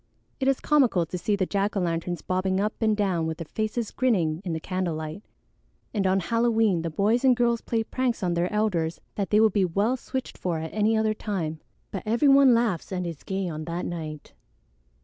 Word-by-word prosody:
It 265 - 0
is 270 -1 +3
comical 255 - +3
to 165 - -7
see 205 +4 0
the 195 -2 0
jack 200 +2 -1
o' - - +2
lanterns 170 0 -2
bobbing 185 +1 0
up 210 +2 0
and 215 -2 +2
down 185 -6 0
with 160 -1 -3
their 165 - -6
faces 215 +5 -3
grinning 180 -11 +1
in 175 -4 -3
the 160 - -2
candle 185 -1 -2
light. 155 +4 -6 0.7
And 200 -3 +1
on 190 +1 +2
Halloween 225 -3 +2
the 165 - -2
boys 210 - +1
and 255 -2 +5
girls 235 -1 +2
play 225 -1 -1
pranks 245 -2 -2
on 175 -1 +1
their 170 +1 0
elders 185 -7 0
that 200 -2 -2
they 210 - +4
would 220 -2 +4
be 200 - +3
well 200 +8 +1
switched 260 0 -5
for 175 -3 -1
at 160 0 -5
any 215 +1 +2
other 220 0 +2
time; 175 -8 -3 0.3
but 195 - -4
every 235 +7 +3
one 275 -3 +7
laughs 225 -9 0
and 180 -1 -2
is 165 -4 -6
gay 190 -1 -3
on 155 -2 -5
that 170 +2 -3
night." 155 -4 -6
195 Hz, 215 wpm, -26 LUFS, 170-225 Hz, 0.7 s, one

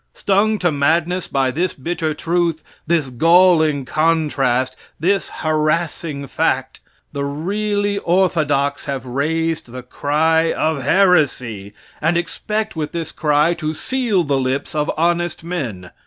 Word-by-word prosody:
Stung 205 +2 +2
to 175 -4 +1
madness 165 +5 +1
by 135 -1 0
this 175 +7 -1
bitter 155 +2 -2
truth, 170 -1 -1 0.2
this 160 -5 +1
galling 160 0 +4
contrast, 135 -4 +1 0.2
this 195 +5 +1
harassing 155 -1 -1
fact, - - -1 0.3
the 140 - -3
really 205 +7 -1
orthodox 155 -7 +1
have 135 -2 -4
raised 160 +5 -1
the 125 0 -7
cry 160 +5 +1
of 155 -3 -1
heresy, 130 - +2 0.3
and 165 +3 +2
expect 210 +5 -3
with 155 -2 -4
this 165 -2 -4
cry 150 +1 +2
to 155 -2 -4
seal 235 -2 0
the 140 -3 0
lips 130 +2 -2
of 150 0 -1
honest 175 0 0
men. 120 - -5
160 Hz, 125 wpm, -19 LUFS, 140-175 Hz, 0.3 s, galling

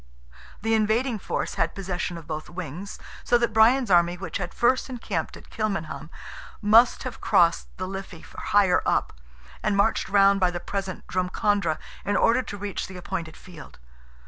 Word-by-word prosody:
The 225 0 +1
invading 220 +2 +1
force - - -3
had 165 0 0
possession 180 -2 -3
of 165 - -10
both 155 -1 -5
wings, 180 +2 -7 0.3
so 240 - +4
that 235 -2 0
Brian's 230 +2 +4
army, 175 0 +4
which 190 - -4
had 180 -3 -4
first 255 +3 +1
encamped 215 -9 -4
at - - -17
Kilmainham, 195 -8 -3 0.5
must 225 +3 +5
have - - -6
crossed 170 -1 +3
the 185 - -4
Liffey 190 -3 -7
higher 195 -3 +2
up, - - 0 0.5
and 205 -1 0
marched 200 +1 +2
round 200 0 +5
by 185 -1 +3
the 175 0 -4
present 195 -1 -5
Drumcondra 185 -1 0 0.3
in 200 0 0
order 235 +3 +4
to 205 - -7
reach 200 0 -4
the 185 - -9
appointed 175 -3 -5
field. 170 -6 -13
195 Hz, 165 wpm, -25 LUFS, 175-215 Hz, 0.5 s, must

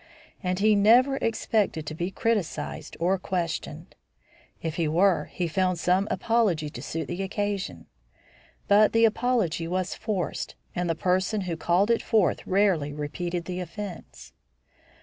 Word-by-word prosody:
And 180 0 -1
he 215 +2 +4
never 245 +7 +5
expected 220 - 0
to 155 - -5
be 175 +3 -3
criticised 195 -7 -2
or 180 +3 +1
questioned. 175 -3 -4 0.7
If 160 -1 -3
he 165 -2 +1
were, 180 +4 +3
he 175 - -3
found 185 +1 0
some 185 +4 +2
apology 195 -10 +1
to - - -8
suit 160 -3 -4
the 185 - -4
occasion; 195 - -3 0.8
but 210 +1 +5
the 230 0 +5
apology 220 -8 +1
was 185 +1 -1
forced, 210 -5 -3 0.2
and 175 -1 -2
the 165 - +1
person 185 +5 0
who 180 -3 -3
called 180 +6 +2
it 230 - +2
forth 215 -6 +1
rarely 185 -7 +2
repeated 170 +4 -4
the 180 0 -4
offence. 180 +1 -8
185 Hz, 145 wpm, -26 LUFS, 165-210 Hz, 0.8 s, never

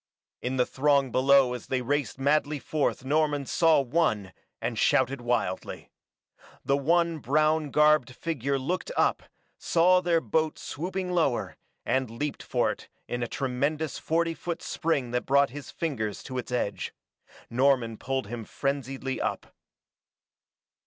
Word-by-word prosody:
In 125 +1 -2
the 125 - +3
throng 140 -1 +2
below 130 0 +4
as 125 - -7
they 130 -1 -1
raced 145 +2 -1
madly 145 +2 +1
forth 145 -2 -1
Norman 145 0 +1
saw 165 +3 +4
one, 120 - 0 0.3
and - - -3
shouted 130 0 +2
wildly. 120 -6 -2 0.7
The 140 - +3
one 165 +3 +2
brown 155 +2 +2
garbed 150 -3 +4
figure 140 -4 -2
looked 175 - -3
up, - - +2 0.4
saw 180 +2 +4
their 175 -2 +2
boat 155 +4 0
swooping 180 +3 -4
lower, 160 -8 0 0.3
and 130 -2 0
leaped 145 +6 -4
for - - 0
it - - -10 0.2
in 120 - -3
a 120 - -1
tremendous 140 +5 -2
forty 165 +1 0
foot 170 0 -5
spring 155 -8 -1
that 125 0 -2
brought 140 0 +4
his 145 +1 -8
fingers 115 -11 -3
to 130 -1 -4
its 125 - -7
edge. 120 -5 -2 0.6
Norman 125 -2 +2
pulled 135 +1 -3
him 115 +2 -6
frenziedly 135 +1 -3
up. - - -3
140 Hz, 140 wpm, -27 LUFS, 125-155 Hz, 0.7 s, below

